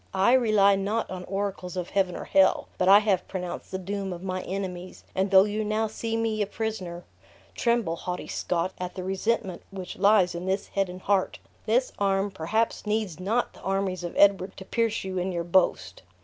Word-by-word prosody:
I 195 +6 +4
rely 215 -6 +5
not 205 +4 -1
on 185 -1 -6
oracles 195 -2 -4
of 180 -1 -4
heaven 190 -3 +1
or - - -5
hell; 190 -1 +3
but 185 - +2
I 195 +1 +9
have 200 -4 +1
pronounced 180 -2 -5
the 190 - -3
doom 195 +1 -4
of 175 0 -7
my 185 -1 -3
enemies; 185 -1 -5
and 190 +1 0
though 190 -1 +7
you 210 +1 -2
now 215 +1 0
see 225 +1 -3
me 225 -1 0
a 205 - 0
prisoner, 200 -6 -4 0.5
tremble, 235 -8 +1
haughty 180 0 -4
Scot, 175 +1 -1
at 180 0 -5
the 185 - -5
resentment 190 0 -1
which 190 -2 -7
lies 200 -2 +4
in 175 +2 -5
this 190 +1 -1
head 195 -2 0
and 180 +1 -8
heart. 195 -2 +1 0.3
This - - +2
arm 195 0 +1
perhaps 210 +6 -1
needs 210 -5 -1
not 220 +6 0
the - - -16
armies 195 -2 -1
of 175 - -5
Edward 200 -1 +4
to 190 - -9
pierce 230 +1 0
you 190 -1 -3
in 185 +1 -1
your 170 -1 -2
boast!" 170 - +1
195 Hz, 200 wpm, -26 LUFS, 185-210 Hz, 0.5 s, I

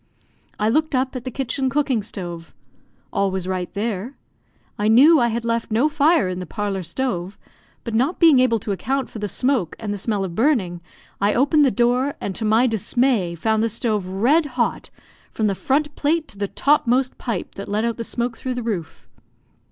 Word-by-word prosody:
I 210 - +1
looked 310 +5 +1
up 260 +1 0
at 250 -1 -6
the - - -2
kitchen 265 +1 -2
cooking 270 -4 +1
stove. 175 -5 -7 0.6
All 200 0 +1
was 190 -1 -3
right 185 -1 -3
there. 220 +4 -3 0.6
I 210 - +1
knew 280 +9 +7
I 240 - +3
had 235 0 -2
left 230 0 -1
no 230 +7 +2
fire 300 - +3
in 185 0 -3
the 180 - -6
parlour 205 -3 -3
stove; 185 0 -3 0.5
but 230 - -5
not 260 +10 +1
being 320 -6 +6
able 250 -3 +3
to 205 - -3
account 265 +7 -2
for 220 - -7
the 210 - -2
smoke 250 - 0
and 210 -2 -4
the 205 - -4
smell 205 -1 -1
of 190 - -4
buring, 195 - +1 0.4
I 205 +1 +2
opened 290 +4 +4
the - - +4
door, 250 +3 +1
and 195 - -4
to 220 - -4
my 220 +3 +3
dismay 225 -4 +1
found 220 +6 0
the 230 - +1
stove 215 -4 -1
red 250 - +2
hot, - - -1 0.4
from 220 - -1
the 200 - +2
front 290 +8 -1
plate 315 +2 0
to - - -8
the 200 - -1
topmost 260 0 +1
pipe 230 -8 -4
that 200 - -8
let 210 +2 0
out 235 -1 -1
the 230 - -3
smoke 235 +1 -2
through 255 -1 -3
the 245 - -4
roof. 195 -8 -5
230 Hz, 200 wpm, -21 LUFS, 200-265 Hz, 0.6 s, knew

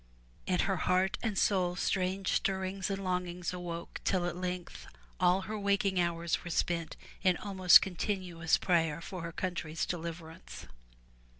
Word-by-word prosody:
In 180 -1 +2
her 195 -1 0
heart 185 +3 +1
and 220 -4 -2
soul 180 -3 +2
strange 190 +1 0
stir 190 -1 +1
rings 190 +1 -3
and 195 0 -3
longings 180 -1 -2
awoke 170 -2 -6
till 185 -2 +1
at 175 - -2
length 180 -1 -5 0.3
all 180 +2 +4
her 215 +2 -5
waking 200 -2 +1
hours 170 -1 0
were 175 - -6
spent 170 0 -1 0.2
in 185 -2 +3
almost 185 -3 +6
continuous 180 -3 -1
prayer 165 -4 +1
for 180 +1 -7
her 165 0 -5
country's 165 -3 -3
deliverance. 165 -1 -7
180 Hz, 145 wpm, -31 LUFS, 170-190 Hz, 0.3 s, almost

